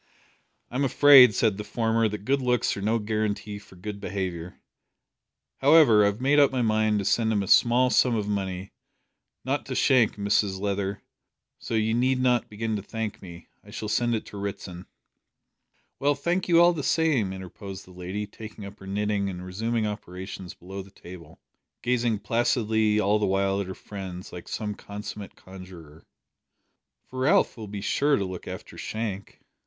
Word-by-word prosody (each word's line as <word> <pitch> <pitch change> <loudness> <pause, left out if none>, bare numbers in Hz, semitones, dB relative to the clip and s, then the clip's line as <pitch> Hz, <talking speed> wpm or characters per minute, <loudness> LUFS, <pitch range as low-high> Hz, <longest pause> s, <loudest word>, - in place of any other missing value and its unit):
"I'm 130 +3 -1
afraid," 135 -4 +7
said 110 -4 +2
the - - -3
former, 115 0 0
"that 105 0 -7
good 140 +2 +1
looks 125 -2 +1
are 100 - -6
no 110 +3 +1
guarantee 105 -1 -2
for 100 - -17
good 100 +3 -7
behaviour. 90 -3 -5 1.0
However, 140 -6 +6
I - - +5
have 100 +2 -2
made 140 +3 +3
up 140 - +5
my 130 -2 0
mind 110 -1 +2
to 100 - -2
send 110 +2 +2
him 105 -2 +1
a - - -6
small 125 +4 +4
sum 125 -2 +3
of 105 -2 -2
money 95 -2 -3 0.7
not - - -1
to - - -4
Shank, 125 -5 +3
Mrs 100 -1 0
Leather, 100 0 -2 0.6
so - - -4
you 110 0 +1
need 130 +2 +2
not 125 -2 +2
begin 110 +1 -3
to - - -5
thank 110 +1 -5
me. 85 -2 -11 0.2
I - - -17
shall 110 - -5
send 120 +2 +1
it 110 - -4
to 105 - -10
Ritson." 95 -3 -6 1.1
"Well, 145 +1 +2
thank 170 +6 -1
you 170 -2 +5
all 175 +1 +6
the 160 - -4
same," 140 - +1
interposed 95 +1 -8
the 95 - -16
lady, 90 +3 -5
taking 105 0 -10
up 100 +1 -11
her 95 - -11
knitting 100 0 -1
and 90 -1 -7
resuming 110 +4 -2
operations 95 -2 -7
below 95 +2 -8
the 95 - -14
table, 85 -4 -13 0.4
gazing 120 -3 0
placidly 110 -1 +1
all 105 +1 +2
the 105 - +1
while 95 +1 +1
at 100 - -5
her 95 - -6
friends 95 -3 -8
like 90 - -9
some 105 -1 -3
consummate 105 0 -8
conjuror, 90 -5 -13 1.0
"for 130 - -8
Ralph 160 +10 +3
will 110 -2 -8
be 100 0 -6
sure 145 +7 +2
to 100 - -1
look 95 -1 -7
after - - -8
Shank." 110 -3 -5
105 Hz, 180 wpm, -26 LUFS, 95-120 Hz, 1.1 s, afraid